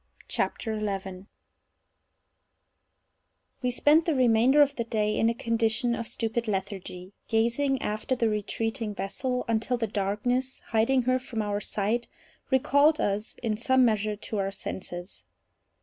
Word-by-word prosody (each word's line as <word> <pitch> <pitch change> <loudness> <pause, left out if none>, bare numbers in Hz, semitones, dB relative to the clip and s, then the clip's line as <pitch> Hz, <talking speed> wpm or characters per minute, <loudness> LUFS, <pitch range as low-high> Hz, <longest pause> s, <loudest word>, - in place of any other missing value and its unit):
CHAPTER 225 - -2
11 195 -3 -4 2.3
We 250 - +1
spent 295 +6 +4
the 325 -4 +1
remainder 255 +3 +5
of 285 0 -2
the 235 - -1
day 215 -2 0
in 225 - +3
a 230 - -1
condition 230 +1 +1
of 230 -1 -3
stupid 230 +1 -1
lethargy, 190 -2 -4
gazing 235 +5 +1
after 215 +5 -1
the 235 -2 +1
retreating 220 +1 -2
vessel 250 +7 -2
until 230 +2 0
the 235 - 0
darkness, 220 +6 -1
hiding 235 +3 +3
her 255 +1 +2
from 235 -4 -4
our 205 0 -2
sight, 215 +4 -1 0.4
recalled 285 +3 +4
us 205 +2 -1
in 215 -2 0
some 260 +2 +4
measure 215 -2 +1
to 210 0 -4
our 195 0 -1
senses. 180 -2 -6
225 Hz, 135 wpm, -27 LUFS, 210-250 Hz, 2.3 s, remainder